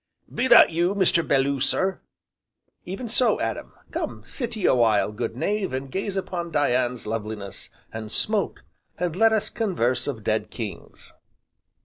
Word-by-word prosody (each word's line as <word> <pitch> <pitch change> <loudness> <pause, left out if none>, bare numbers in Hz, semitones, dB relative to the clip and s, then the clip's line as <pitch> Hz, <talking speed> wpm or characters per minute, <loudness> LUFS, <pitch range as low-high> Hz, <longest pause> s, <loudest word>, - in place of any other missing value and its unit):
'" - - -24
"Be 250 +2 +1
that - - +8
you, 175 +4 +1
Mr. 185 -3 +3
Belloo, 140 0 +2
sir?" 190 +8 0 0.8
"Even 195 +7 -5
so, 245 +3 +2
Adam. - - -3 0.2
Come - - -4
sit 240 -4 -4
ye 210 - -2
a - - +5
while, 110 -4 +3
good 110 +1 -4
knave, 200 +2 -1
and 130 0 -4
gaze 195 +3 -3
upon 175 -3 -3
Dian's 125 -5 +1
loveliness, 105 -2 -4 0.2
and 110 -1 -6
smoke, 210 -3 0 0.3
and 175 -2 -2
let 225 +3 +5
us 220 -1 0
converse 130 - 0
of 120 -7 -4
dead - - 0
kings." - - -7
170 Hz, 155 wpm, -25 LUFS, 120-200 Hz, 0.8 s, that